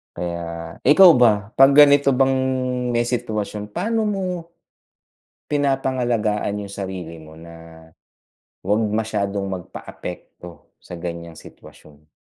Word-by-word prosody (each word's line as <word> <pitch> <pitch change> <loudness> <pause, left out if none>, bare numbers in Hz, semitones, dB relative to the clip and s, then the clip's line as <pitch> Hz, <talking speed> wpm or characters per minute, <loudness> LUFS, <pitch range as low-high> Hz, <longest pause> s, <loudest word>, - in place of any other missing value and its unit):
Kaya, 85 -1 -6
ikaw 180 +5 +8
ba, 105 -4 +2
'pag 135 +1 +7
ganito 145 -1 +6
bang 135 +1 +2 0.6
may 120 0 +1
sitwasyon, 105 -4 -4
paano 225 -1 -1
mo 195 -2 -2 1.2
pinapangalagaan 120 -7 -1
yung 100 - -11
sarili 90 -5 -7
mo 80 0 -14
na 80 0 -14 0.8
'wag 105 +3 +1
masyadong 100 -2 -2
magpaapekto 90 -2 -9
sa 85 - -9
ganiyang 85 -1 -7
sitwasyon? 75 0 -17
105 Hz, 105 wpm, -21 LUFS, 85-130 Hz, 1.2 s, ikaw